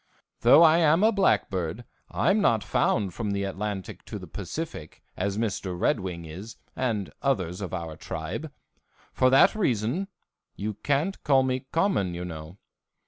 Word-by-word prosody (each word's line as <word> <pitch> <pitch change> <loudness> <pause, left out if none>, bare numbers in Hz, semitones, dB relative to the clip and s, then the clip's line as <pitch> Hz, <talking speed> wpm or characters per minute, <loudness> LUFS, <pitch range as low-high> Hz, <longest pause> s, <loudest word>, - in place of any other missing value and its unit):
Though 140 +8 +7
I 165 +1 +6
am 165 +3 +4
a 220 - +6
blackbird, 105 - 0 0.2
I'm 195 +4 +2
not 110 - +3
found 95 -4 +1
from 105 +1 -3
the 100 0 -1
Atlantic 100 0 -4
to - - -6
the - - -9
Pacific, 155 - -7
as 100 +2 -2
Mr. 100 -5 -2
Red 110 - +2
Wing 90 -3 -5
is 95 +8 -9 0.2
and 115 -7 -2
others 95 -9 -1
of 95 - -4
our 85 -4 -5
tribe. - - -5 0.6
For 130 - +4
that 135 - +6
reason 135 - 0 0.5
you 105 +1 -3
can't 145 - -1
call 135 -2 +4
me 130 0 -2
common, 165 - +1
you 90 +1 -4
know. 80 +1 -8
110 Hz, 155 wpm, -26 LUFS, 95-140 Hz, 0.6 s, Though